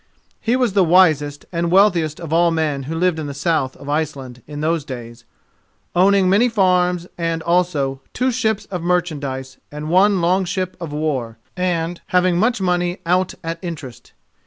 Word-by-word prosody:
He 235 +2 +1
was 250 -5 +1
the 195 -2 +4
wisest 155 -5 +3
and 170 -1 -1
the - - 0
wealthiest 175 -5 +3
of 160 -2 -5
all 170 +1 +4
men 155 -4 -1
who 165 - -3
lived 175 -1 +1
in 150 - -4
the 140 - -6
south 145 -3 0
of 140 - -12
Iceland 140 -5 -3
in 145 0 -7
those 160 0 0
days, 120 -3 -9 0.7
owning 190 +1 +4
many 210 +7 +4
farms 180 -4 +2
and, 165 -1 -1
also, 155 -7 0
two 255 +1 0
ships 220 -4 -1
of 180 -3 -3
merchandise 145 -7 -2
and 150 +2 -5
one 195 +2 +4
long 180 +3 +2
ship 185 0 -3
of 165 -3 -5
war, 140 -7 -2 0.2
and 175 -2 -1
having 180 -1 +2
much 230 +3 +2
money 180 -1 0
out 180 +2 +1
at 165 0 -4
interest. 155 -9 -8
170 Hz, 175 wpm, -20 LUFS, 150-185 Hz, 0.7 s, the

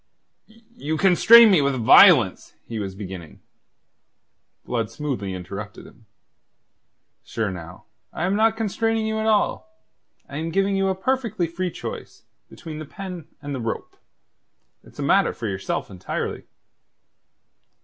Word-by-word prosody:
"You 220 -8 -7
constrain 215 +5 +7
me 180 -6 +5
with 140 -1 +1
violence..." 115 -3 +5
he 115 -2 -6
was 95 -2 -5
beginning. 95 -5 -9 1.3
Blood 115 -3 -2
smoothly 125 -11 -4
interrupted 100 +3 -8
him. 115 -2 -18 1.2
"Sure, 110 -3 -3
now, 90 -1 -10 0.3
I 165 - -3
am 190 +2 0
not 225 +1 +2
constraining 225 +1 -1
you 220 0 -2
at 220 - -1
all. 220 +8 +1 0.6
I'm 155 +4 -5
giving 195 +3 +1
you 195 0 +1
a 190 - 0
perfectly 220 -2 -1
free 175 +3 -3
choice - - -8 0.3
between 155 -2 -9
the 155 - -7
pen 180 0 -8 0.2
and 145 0 -5
the 130 - -4
rope. 115 0 -5 0.9
It's - - -19
a - - -4
matter - - +3
for 115 - -7
yourself 100 +1 -4
entirely." 90 -2 -5
160 Hz, 135 wpm, -23 LUFS, -, 1.3 s, constrain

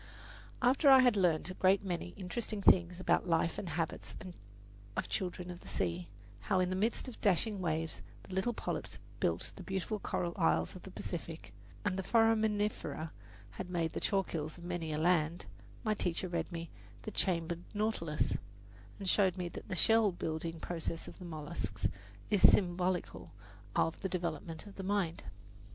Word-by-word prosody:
After 270 +4 +5
I 265 -1 +10
had 245 -3 +5
learned 180 -2 +2
a - - -5
great 190 +2 +4
many 175 -1 -2
interesting 210 +3 -3
things 180 -2 +5
about 185 - +2
the - - -5
life 165 0 +2
and 185 - -4
habits 165 -1 -3
of 185 -2 -8 0.6
the - - +3
children 180 -1 -3
of 175 - -8
the - - -14
sea 85 -1 -1 0.3
how 190 -2 +1
in 180 0 +2
the - - 0
midst 220 +7 0
of 250 - -9
dashing 200 +1 +2
waves 160 -2 -1 0.2
the 190 - -10
little 190 +6 +1
polyps 235 - -4 0.2
build - - +1
the - - -9
beautiful 195 +2 -2
coral 175 -3 -1
isles 80 +1 +2
of - - -9
the - - -10
Pacific, - - -6 0.3
and 185 - +1
the - - -1
foraminifera 215 -6 +2 0.4
have 180 - -6
made 170 -3 0
the - - -2
chalk 195 -3 +1
hills 155 0 -3
of 170 - -11
many 175 -2 -3
a 150 - -1
land 165 0 +2 0.4
my 215 - +2
teacher 180 -2 -1
read 170 0 -2
me 170 -1 -5 0.3
"The 215 - -5
Chambered 170 -3 0
Nautilus," 205 -8 0 0.6
and 195 - -6
showed 190 -1 +3
me 180 -1 -2
that - - -9
the 185 - -1
shell 225 +2 +5
building 165 -1 -3
process 165 0 -3
of - - -10
the 180 - -8
mollusks 155 -3 -3 0.4
is 205 -3 +3
symbolical 180 -1 +3 0.4
of 165 - +2
the 190 - -1
development 165 -2 -3
of 205 - -12
the 195 - -4
mind. 190 -4 0
180 Hz, 175 wpm, -34 LUFS, 165-200 Hz, 0.6 s, I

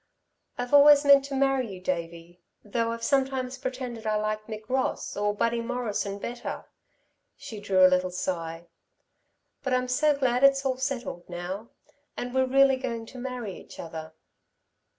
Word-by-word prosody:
"I've 245 +2 -4
always 290 0 +8
meant 280 -1 +7
to 280 -1 -5
marry 270 -4 +1
you, 185 - -8
Davey, 170 -1 -5 0.2
though 230 +2 -1
I've 230 0 -6
sometimes 265 -2 0
pretended 255 -4 -5
I 215 - +1
liked 215 0 -2
Mick 215 -1 -7
Ross, 260 +1 -1
or 205 0 0
Buddy 230 +2 0
Morrison 230 -4 -3
better." 240 +4 -6 0.7
She 220 - -8
drew 190 -2 +4
a - - +10
little 185 0 +2
sigh. 170 -2 -4 1.0
"But 265 -2 -2
I'm 250 0 0
so 290 +3 +2
glad 255 -1 +1
it's 275 0 +5
all 260 -1 0
settled, 255 -10 -4
now... 180 +5 -5 0.5
and 245 0 -4
we're 260 0 +2
really 270 0 +5
going 230 -3 -4
to 250 +3 -11
marry 245 -6 -5
each - - -14
other." 160 -1 -7
235 Hz, 160 wpm, -27 LUFS, 200-260 Hz, 1.0 s, a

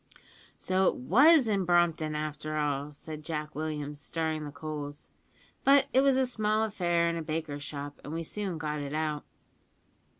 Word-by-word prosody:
"So 185 +1 +2
it - - +2
was 265 - +5
in 200 -3 +1
Brompton, 170 -3 +2
after 155 0 -3
all," 145 -1 -1
said 155 +1 -8
Jack 150 -1 -4
Williams, 150 -1 -4
stirring 160 -1 -2
the 145 - -6
coals; 145 -1 -7 0.5
"but 275 0 +6
it 265 - +6
was 275 -1 +4
a 265 - +3
small 215 -3 +1
affair 175 -5 +1
in 170 0 -1
a - - -3
baker's 155 -2 -4
shop, 145 0 -6
and 145 - -7
we 165 +1 -3
soon 190 0 -3
got 150 -1 -3
it 145 0 -5
out." 155 -1 -2
155 Hz, 170 wpm, -29 LUFS, 150-185 Hz, 0.5 s, but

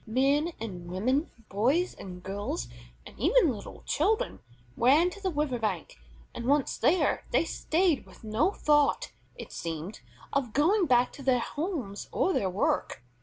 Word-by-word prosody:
Men 280 +8 +2
and 180 -6 -6
women, 255 - 0 0.2
boys 265 - +1
and 180 -2 -10
girls, 195 - -3 0.4
and - - -11
even 345 - +4
little 215 - -9
children, 435 +1 0 0.4
ran 295 +9 +4
to 400 - -11
the 380 - 0
river 295 -6 -1
bank: 190 - -3 0.4
and, 235 - -6
once 285 0 +2
there, 350 +4 +2
they - - +2
stayed, 330 -2 +1
with - - -17
no 215 - +2
thought, 300 - +2 0.2
it - - -9
seemed, 165 +4 -5 0.3
of 260 -6 0
going 350 +6 +3
back 245 -1 +3
to - - -10
their 260 -2 +3
homes 270 - -4
or 380 - +1
their 195 - +1
work. 180 - -1
265 Hz, 155 wpm, -29 LUFS, 210-330 Hz, 0.4 s, even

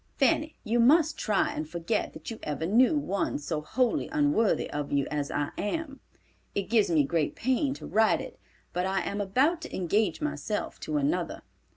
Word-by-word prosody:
Fanny, 300 +3 +2
you 235 +1 +1
must 305 +6 +5
try 210 -3 +1
and 155 0 -4
forget 170 +6 -2
that - - -8
you 225 - -7
ever 150 +2 -3
knew 245 - +4
one 200 -9 -1
so 150 +1 -3
wholly 240 +10 0
unworthy 290 -8 +2
of 145 -1 -3
you 140 -1 +2
as 145 -1 -2
I 145 0 -2
am. 280 +5 -3 0.6
It 200 +1 -2
gives 220 -5 +4
me 160 -4 +4
great 155 +1 0
pain 260 +3 0
to - - -9
write 220 0 +3
it, - - -8 0.3
but 180 +1 0
I 190 0 0
am 205 +1 -3
about 270 - +2
to - - -7
engage 200 +4 +1
myself 300 -1 -3
to 300 - -2
another. 290 +2 -1
220 Hz, 185 wpm, -28 LUFS, 170-280 Hz, 0.6 s, must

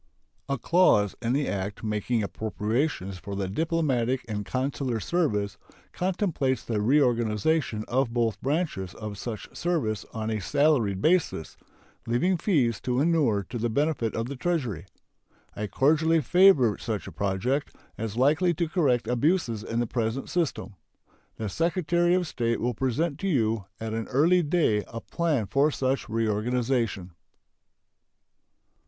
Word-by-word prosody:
A 140 - 0
clause 125 - +3
in 120 +1 0
the 140 +1 +1
act 100 +2 -4
making 110 +1 -1
appropriations 105 - -2
for 100 +1 -6
the 100 -1 -2
diplomatic 130 - 0
and 105 -2 -3
consular 130 0 -2
service 105 - -1 0.3
contemplates 175 - -1
the 110 -3 -1
reorganization 120 -1 +1
of 130 0 +1
both 115 -4 0
branches 140 - -2
of 105 -2 -6
such 110 +1 -7
service 150 -12 -1
on 110 0 -3
a 110 -2 -2
salaried 105 - +2
basis, 160 - +1 0.5
leaving 150 +11 +2
fees 140 - +1
to 125 0 0
inure 145 -10 +2
to 120 - -4
the 120 +1 0
benefit 135 -3 0
of 115 - -1
the 140 +3 -5
Treasury. 125 - -2 0.7
I 105 - -3
cordially 160 +7 +3
favor 150 - +5
such 110 -3 -3
a 95 - -8
project, 100 - -1 0.2
as 110 0 -5
likely 155 +7 +3
to 170 +1 0
correct 145 -8 +1
abuses 125 - +1
in 115 +1 -2
the 120 - +1
present 115 +2 -2
system. 165 - -1 0.6
The 110 - -4
Secretary 175 - +1
of 180 -1 +1
State 115 -6 -1
will 120 +1 0
present 140 +6 -1
to 195 - -2
you 115 - +1
at 110 0 -4
an 115 0 -3
early 165 +7 +4
day 145 -10 +1
a 115 - -6
plan 150 -3 -1
for 140 +8 +2
such 135 -4 -1
reorganization. 115 -2 0
125 Hz, 140 wpm, -27 LUFS, 110-155 Hz, 0.7 s, favor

